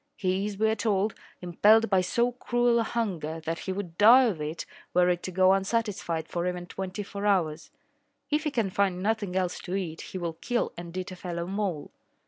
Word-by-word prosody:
He 190 0 0
is, 205 -2 -6
we 220 +2 +2
are 220 - +2
told, 210 -2 0 0.3
impelled 210 +6 +4
by 190 -1 +4
so 235 +7 +1
cruel 240 -1 +1
a - - +2
hunger 180 -10 -2
that 165 +1 -3
he 190 - -4
would 185 -3 -6
die 235 +5 +8
of 205 -11 0
it 155 +2 -4 0.3
were 180 0 +5
it 175 -1 0
to 185 - -5
go 185 +1 +5
unsatisfied 195 -5 -1
for 175 0 -2
even 180 -1 -3
twenty 190 +3 -5
four 200 +1 -4
hours. 165 -6 +1 0.6
If 300 +1 +1
he - - +2
can 225 -8 -1
find 185 -2 0
nothing 205 -3 -1
else 185 -1 -1
to 180 - -4
eat, 170 -5 -3
he - - -7
will 170 -2 -3
kill 245 -1 0
and 170 +1 -8
eat 185 0 -4
a - - -7
fellow 170 -2 -4
mole. 190 -5 -3
190 Hz, 210 wpm, -27 LUFS, 175-215 Hz, 0.6 s, die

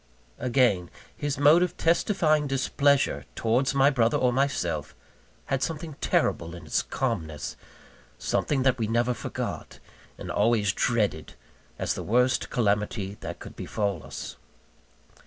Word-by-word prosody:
Again, 120 -9 +2 0.3
his 145 -2 -2
mode 150 +5 +6
of 180 - 0
testifying 165 -3 +2
displeasure 140 +1 +1
towards 125 +4 +1
my 140 +1 +5
brother 120 -4 +2
or 125 -1 +2
myself, 135 +2 -1 0.5
had 135 -1 -1
something 160 +1 -3
terrible 85 +1 0
in 85 - -10
its - - +1
calmness, 80 - -3 0.6
something 135 -3 0
that 130 -2 +2
we 110 - 0
never 120 +2 +1
forgot, - - -5 0.4
and - - -6
always 105 -2 +2
dreaded 105 -11 0 0.4
as - - -1
the - - -5
worst 125 +3 +2
calamity 105 -3 0
that - - -6
could - - -11
befall 100 -6 -2
us. - - -7
125 Hz, 130 wpm, -27 LUFS, 105-140 Hz, 0.6 s, mode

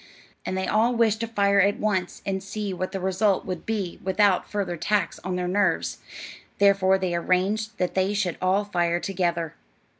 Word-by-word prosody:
And 190 - -2
they 190 - -1
all 230 +3 +2
wished 225 -2 +2
to 230 - -2
fire 200 -3 +3
at 200 +1 +2
once, 190 -4 -2
and 190 -1 -2
see 200 +1 -4
what 185 +1 -3
the 195 - -3
result 190 +2 +1
would 180 -3 -5
be 205 -6 -3
without 195 0 +2
further 200 -4 -2
tax 200 +1 -1
on 185 -1 -4
their 180 0 -2
nerves; 205 +3 0 0.6
therefore 195 -1 +4
they 185 -2 -2
arranged 200 +6 0
that 180 - -1
they 190 +2 +1
should 185 -4 -1
all 190 +3 +2
fire 175 -3 0
together. 175 -4 -1
190 Hz, 180 wpm, -25 LUFS, 180-205 Hz, 0.6 s, therefore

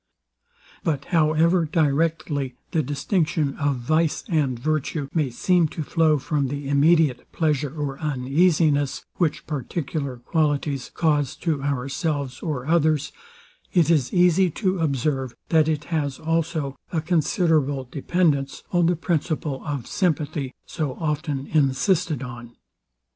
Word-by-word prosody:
But 145 -4 -1
however 165 +1 +3
directly 150 -3 0 0.2
the 160 - +2
distinction 150 +1 0
of 145 -1 +1
vice 155 +6 0
and 150 - +1
virtue 150 +2 -1
may 155 -5 +1
seem 175 +7 +2
to 155 - -5
flow 160 0 +3
from 140 0 -1
the 140 +1 -4
immediate 145 -2 +3
pleasure 150 -3 0
or 140 -2 -3
uneasiness, 150 +1 +1
which 165 -5 0
particular 140 -1 -3
qualities 145 0 -1
cause 150 -4 +1
to 155 -4 +1
ourselves 140 0 -2
or 145 -7 -3
others; 155 -2 +2 0.6
it 170 -3 +4
is 140 -7 +2
easy 180 +1 +4
to 185 +2 -1
observe, 135 -4 -1
that 160 -2 +4
it 155 -2 0
has 145 -4 -1
also 160 -3 -1 0.2
a 165 - 0
considerable 155 - +1
dependence 140 +1 0
on 175 -2 +3
the 175 - +2
principle 155 -4 -2
of 140 -6 -4
sympathy 150 -6 -1
so 150 -6 -3
often 150 -3 -2
insisted 155 - +1
on. 120 -2 -9
150 Hz, 125 wpm, -24 LUFS, 140-165 Hz, 0.6 s, it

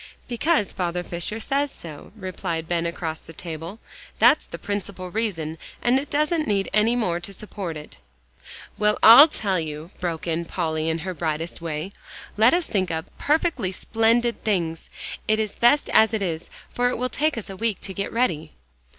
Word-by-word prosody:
"Because 250 - +1
Father 175 -1 -2
Fisher 175 +6 -4
says 280 +5 0
so," 155 -4 -10
replied 185 -5 -4
Ben 170 0 0
across 165 -2 -4
the 165 - -13
table; 165 +5 -6 0.4
"that's - - +5
the - - -7
principal 200 -3 -4
reason 165 -8 -2 0.2
and 245 +2 +3
it 280 - -7
doesn't 305 +2 +1
need 200 -2 0
any 215 +3 +4
more 180 -8 0
to 175 +3 -8
support 195 -4 -6
it" 150 - -11 0.8
"Well, 210 0 +3
I 240 +7 +11
tell 200 - -1
you," 155 +2 -6
broke 170 -3 -3
in 170 0 -1
Polly 160 -1 -1
in 160 - 0
her 185 - -2
brightest 165 0 -3
way, 165 +2 -4 0.4
"let 225 +4 +6
us 345 -1 +2
think 190 -3 0
up 160 -1 -5
perfectly 295 - +1
splendid 230 +4 +1
things. 170 -6 -1 0.4
It's 215 -1 +1
best 285 +5 +4
as 220 0 +5
it 210 - -1
is, 165 -3 -3 0.2
for 245 0 0
it - - -2
will 250 +2 0
take 300 +2 0
us 225 - -4
a - - -7
week 220 0 -1
to 190 - -6
get 200 +1 -3
ready." 225 - 0
195 Hz, 175 wpm, -24 LUFS, 165-230 Hz, 0.8 s, I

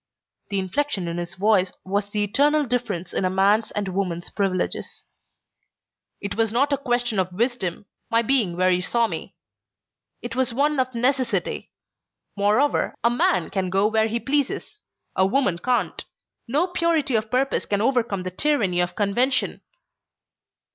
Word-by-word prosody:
The 200 - -1
inflection 195 +1 -1
in 170 0 -3
his 175 +1 -6
voice 195 -2 +2
was 200 +2 -1
the 210 0 0
eternal 290 +8 +2
difference 230 -8 -2
in - - 0
a 185 - +2
man's 200 +4 +3
and 205 -2 -3
woman's 180 -2 -3
privileges. 195 -3 -2 1.1
"It 200 - -4
was 225 0 +1
not 280 +5 +2
a - - +2
question 240 -5 0
of 185 -1 0
wisdom 205 -3 -2 0.2
my 230 +1 +3
being 225 -9 +2
where 185 0 +3
you 180 0 +2
saw 235 +5 +1
me. - - -6 0.9
It 240 -1 -5
was 255 -2 +1
one 290 +1 +2
of 255 -1 -1
necessity. 255 +2 0 0.7
Moreover, 210 +8 +2
a 235 - +4
man 185 -7 +1
can 190 -2 -1
go 195 +2 +2
where 220 0 +2
he 230 +2 -1
pleases. 285 - -2 0.4
A 190 - +3
woman 195 -4 +2
can't. 250 +5 -1 0.4
No 290 +9 +2
purity 335 -6 0
of 220 -1 0
purpose 265 +3 0
can 200 - 0
overcome 230 -5 +1
the 185 - -4
tyranny 200 -5 +1
of 175 0 0
convention." 240 +6 +1
220 Hz, 155 wpm, -23 LUFS, 190-255 Hz, 1.1 s, a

